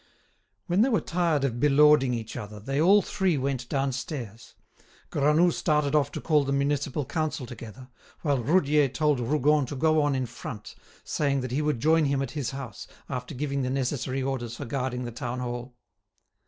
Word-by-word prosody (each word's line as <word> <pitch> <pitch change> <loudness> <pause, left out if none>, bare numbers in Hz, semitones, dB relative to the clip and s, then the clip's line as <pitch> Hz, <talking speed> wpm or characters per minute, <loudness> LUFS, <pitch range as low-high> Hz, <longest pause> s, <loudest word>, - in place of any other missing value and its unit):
When 180 +4 +2
they 255 - +4
were 220 - +3
tired 170 -5 0
of 120 -3 -1
belauding 145 -2 +5
each 110 -1 -6
other, 105 -2 -7
they 135 +7 -1
all 195 +5 +6
three 185 -5 0
went 130 -2 -2
downstairs. 130 - -4 0.6
Granoux 150 +5 +3
started 150 -3 +1
off 145 -2 +2
to - - -3
call 150 -3 +2
the 140 - -2
municipal 140 0 0
council 150 -1 -2
together, 120 +1 -10 0.4
while 140 -5 +1
Roudier 150 0 +3
told 145 +1 +1
Rougon 145 +3 +2
to 145 - -5
go 155 +2 +3
on 145 -2 +1
in 130 -1 -1
front, 110 -2 -8 0.3
saying 140 -2 0
that 130 -1 -5
he 140 +4 0
would 150 -5 0
join 160 +3 +3
him 140 -1 +1
at 135 - -5
his 140 -6 -3
house, 135 -6 -7 0.2
after 125 0 -5
giving 140 +1 -2
the 130 - -1
necessary 130 0 -1
orders 125 -3 -3
for 140 - -6
guarding 125 0 -2
the 120 - -5
Town 120 +2 -4
Hall. 120 0 -5
140 Hz, 180 wpm, -27 LUFS, 125-150 Hz, 0.6 s, all